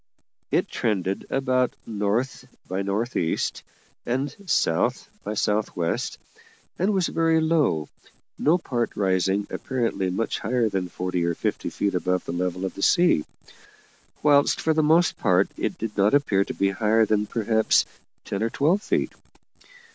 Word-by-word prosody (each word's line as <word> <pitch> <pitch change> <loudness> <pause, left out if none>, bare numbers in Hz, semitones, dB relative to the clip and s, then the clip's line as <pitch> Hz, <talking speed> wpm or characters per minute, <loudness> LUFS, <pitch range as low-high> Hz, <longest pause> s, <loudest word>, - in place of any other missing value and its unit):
It - - +1
trended 95 -4 -2
about 130 -2 +1
north 115 +5 -2 0.2
north 100 +6 -2
east 80 - -1 0.4
and 130 +4 -2
south 80 - +1 0.3
south 105 0 0
west, 85 -2 -2 0.6
and 190 +4 +2
was 190 -3 +1
very 165 0 +2
low, 150 - +1 0.5
no 160 +4 +4
part 120 -9 -2
rising 95 0 +1
apparently 115 -7 -1
much 105 +5 -2
higher 120 -2 +1
than 95 -3 -2
forty 90 0 -2
or 85 0 0
fifty - - -2
feet 100 - -1
above 90 0 0
the - - -4
level 90 +1 -2
of 95 - -4
the 100 - -8
sea; 170 - +4 1.0
whilst 145 -1 +4
for 160 - +1
the 155 - +2
most 160 +3 +3
part 95 -1 +2
it - - -3
did 110 -1 -5
not 105 +5 +3
appear 105 -9 +2
to - - -5
be 100 0 +1
higher 110 +2 +3
than 105 0 +1
perhaps 110 0 +2 0.4
ten 100 - -3
or 115 - +1
twelve 160 - +2
feet. - - 0
110 Hz, 145 wpm, -24 LUFS, 95-135 Hz, 1.0 s, no